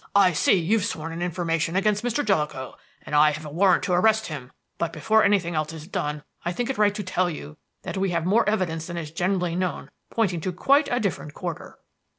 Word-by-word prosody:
"I 190 -3 +6
see 160 - +4
you've 190 +4 +1
sworn 165 -6 -4
an 170 - -5
information 170 -1 -1
against 205 +2 +1
Mr. 245 +4 0
Jellicoe, 150 -9 -1 0.3
and - - -9
I 150 +1 +6
have 155 +1 -7
a 150 - -7
warrant 185 +3 +3
to 180 - 0
arrest 220 +4 +3
him; 135 -5 -7 0.3
but 170 - -1
before 220 0 +2
anything 190 -4 +2
else 155 0 -2
is 160 -1 -9
done 150 -6 -3 0.2
I 175 - -1
think 245 +6 -1
it 260 - -6
right 205 -1 +3
to 210 - -3
tell 185 -1 0
you 75 - -8 0.3
that - - -5
we 190 0 +1
have 170 -2 -1
more 210 +4 +3
evidence 165 -6 -1
than 175 -1 -5
is 155 -3 -5
generally 180 0 0
known 185 0 -3 0.2
pointing 190 -7 0
to 185 - -2
quite 280 - +3
a 245 - +2
different 180 -8 -3
quarter." 170 -3 -6
180 Hz, 220 wpm, -25 LUFS, 160-205 Hz, 0.3 s, I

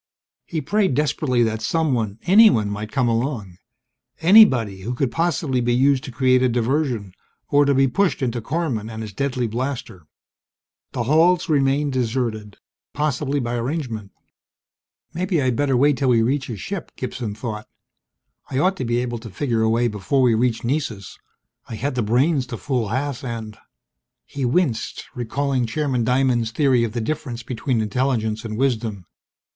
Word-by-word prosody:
He 160 -3 -3
prayed 190 0 +1
desperately 135 -4 +1
that 110 -1 -1
someone 120 -6 0
anyone 180 - +5
might 105 +1 -5
come 125 +1 +1
along. 115 -6 -2 0.6
Anybody 130 - +5
who 120 +6 -4
could 125 -1 -1
possibly 160 -6 0
be 120 0 +1
used 135 +1 +3
to 130 - -7
create 130 +1 +3
a 130 - +3
diversion, 120 -4 -1 0.4
or 145 0 +4
to 140 -1 +2
be 135 +1 +4
pushed 170 +2 0
into 120 -1 -1
Korman 125 -6 -2
and 110 0 -6
his 105 -2 -8
deadly 130 +1 -1
blaster. 115 - -4 0.9
The 120 - -1
halls 165 +7 +3
remained 140 -1 +2
deserted, 115 -4 -2 0.4
possibly 145 -1 -1
by 120 -2 -3
arrangement. 120 -4 -3 1.0
Maybe 180 0 0
I'd 130 -3 +1
better 135 0 +1
wait 145 +1 +3
till 130 0 +1
we 115 -2 +4
reach 135 +3 0
his 115 -5 -6
ship, 195 -4 -5
Gibson 120 -4 -5
thought. 110 -2 -6 0.8
I 130 - -3
ought 185 +7 +2
to 130 - -3
be 120 0 0
able 120 -1 -4
to 115 0 -9
figure 115 +3 -1
a 110 - +2
way 120 +2 +2
before 105 +5 0
we 120 -2 +4
reach 115 +1 0
Nessus. 120 -7 -3 0.5
I 115 - -5
had 135 +6 -2
the 125 - -1
brains 130 +5 +1
to 115 - -6
fool 125 -5 -1
Haas 140 +3 -2
and... 115 -4 -5 0.7
He 140 -2 -4
winced, 125 -3 0
recalling 130 0 -1
Chairman 130 -1 -1
Diamond's 125 -1 +1
theory 130 0 +2
of 115 -2 -2
the 120 - -2
difference 120 -2 -4
between 120 0 -1
intelligence 110 -1 -1
and 110 -2 -5
wisdom. 115 -7 -1
125 Hz, 165 wpm, -22 LUFS, 115-140 Hz, 1.0 s, anyone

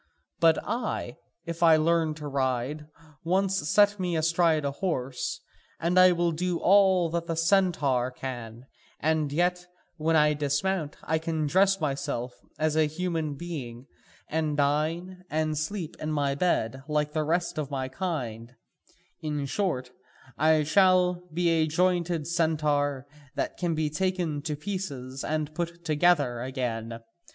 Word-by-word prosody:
But 165 -1 +5
I, 220 - -3 0.3
if 170 0 -6
I 165 -2 +7
learn 160 0 +2
to 150 -1 -7
ride, 135 +2 -1 0.4
once 190 -1 +1
set 205 0 +4
me 180 -2 -1
astride 165 -1 +2
my 140 - -1
horse, 135 -6 -3 0.4
and 175 +2 +2
I 185 0 +8
will 175 -1 +1
do 175 +2 -1
all 190 -3 +4
that 170 0 -2
the 165 - -1
centaur 165 -8 +2
can, 120 -2 -7 0.3
and 155 -2 +1
yet, 180 +3 0 0.3
when 160 +1 +1
I 150 -1 +5
dismount, 150 +3 -1
I 160 0 0
can 160 -1 -2
dress 195 +5 +3
myself 135 -5 -2 0.2
as 155 0 0
a 155 -1 +3
human 160 -2 -2
being, 135 -7 -7 0.4
and 155 -2 -1
dine, 160 +6 0
and 155 0 0
sleep 160 +2 -3
in 155 - -3
my 145 -2 +1
bed, 135 -6 0
like 150 -1 0
the 155 -1 0
rest 170 +1 -1
of 145 -3 -3
my 135 -2 -2
kind: 125 -7 -4 0.7
in 150 -2 -2
short, 135 -6 -2 0.4
I 155 0 +3
shall 180 +1 +3
be 175 +2 0
a 160 -1 +2
jointed 175 -1 +1
centaur 150 -4 0 0.3
that - - -2
can 175 -2 -1
be 155 -1 -1
taken 175 -3 -1
to 150 0 -3
pieces 145 -7 -5
and 155 0 -2
put 170 0 -5
together 150 -6 +2
again. 115 -3 -4
155 Hz, 145 wpm, -27 LUFS, 145-175 Hz, 0.7 s, I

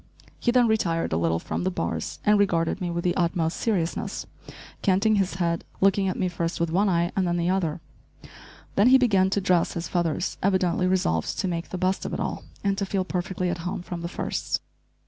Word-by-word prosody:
He - - 0
then 245 -1 +5
retired 170 - 0
a - - +2
little 80 0 +1
from - - -3
the 185 - +1
bars 185 - -3
and 210 0 +5
regarded 180 -2 +1
me 180 - -1
with 170 0 -2
the 175 - +1
utmost 170 -2 0
seriousness, 180 -7 -1 0.6
canting 205 +3 +3
his 190 -3 0
head, 170 -2 0 0.2
looking 195 0 +3
at 185 - -1
me 185 - +1
first 170 -1 -3
with 170 -1 0
one 195 +4 +3
eye 170 0 +1
and 190 -3 +1
then 175 0 0
the 170 +1 +1
other. 170 -4 -1 0.9
Then 200 +4 +4
he 260 +1 +8
began 200 -7 +3
to 200 - +1
dress 180 -3 +2
his 170 -1 -4
feathers, 175 0 -1
evidently 185 -2 +2
resolved 80 - 0
to - - 0
make 170 -2 -3
the 185 - -4
best 185 +1 0
of - - -3
it - - -4
all, - - -3 0.2
and 200 0 +1
to 200 - 0
feel 190 -1 -1
perfectly 180 0 -2
at 175 - -4
home 175 +1 -4
from 175 -1 -6
the 170 - -3
first. 170 - -2
180 Hz, 215 wpm, -25 LUFS, 170-195 Hz, 0.9 s, he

